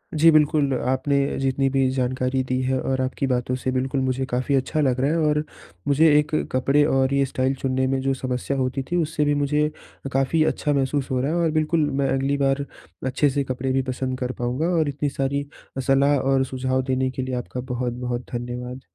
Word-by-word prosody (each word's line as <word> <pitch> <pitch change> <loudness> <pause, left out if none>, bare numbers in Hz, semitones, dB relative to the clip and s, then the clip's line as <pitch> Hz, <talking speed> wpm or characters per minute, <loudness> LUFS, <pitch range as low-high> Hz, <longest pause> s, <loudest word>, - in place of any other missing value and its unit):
जी 160 +2 +6
बिल्कुल, 150 -2 +3
आपने 130 +2 +1 0.2
जितनी 135 0 +1
भी 135 -1 +2
जानकारी 130 0 0
दी 130 0 -1
है 130 0 0
और 130 0 -1
आपकी 130 +1 -1
बातों 125 0 0
से 130 0 -2
बिल्कुल 130 +1 -1
मुझे 130 0 -1
काफ़ी 130 +3 0
अच्छा 135 +4 0
लग 130 -3 +1
रहा 140 +2 +2
है 165 - +1
और 150 0 +1 0.4
मुझे 150 +3 +5
एक 150 0 -2 0.2
कपड़े 135 +3 +3
और 135 -2 +2
ये 140 0 +3
स्टाइल 130 0 -1
चुनने 130 0 0
में 135 0 0
जो 135 0 +1
समस्या 130 +1 -3
होती 130 +1 -1
थी, - - +1
उससे 155 -1 -1
भी 145 - +2
मुझे 150 +1 +1 0.4
काफ़ी 135 +4 +2
अच्छा 150 -1 0
महसूस 135 0 0
हो 130 - +1
रहा 140 +4 0
है। 170 - 0
और 165 -2 +2
बिल्कुल 155 0 +1
मैं 135 0 0
अगली 135 +1 0
बार 140 0 +1 0.4
अच्छे 130 +3 +2
से 140 +1 0
कपड़े 130 0 -3
भी 135 0 +2
पसंद 130 0 -3
कर 125 -1 -2
पाऊँगा 125 +6 -1
और 155 -2 +1
इतनी 145 +1 -2
सारी 140 +1 -2 0.4
सलाह 140 +1 +4
और 135 0 +2
सुझाव 130 0 -1
देने 130 0 0
के 130 - -4
लिए 130 0 -3
आपका 125 +1 -5
बहुत-बहुत 125 0 -3
धन्यवाद। 125 +1 -5
135 Hz, 205 wpm, -23 LUFS, 130-140 Hz, 0.4 s, जी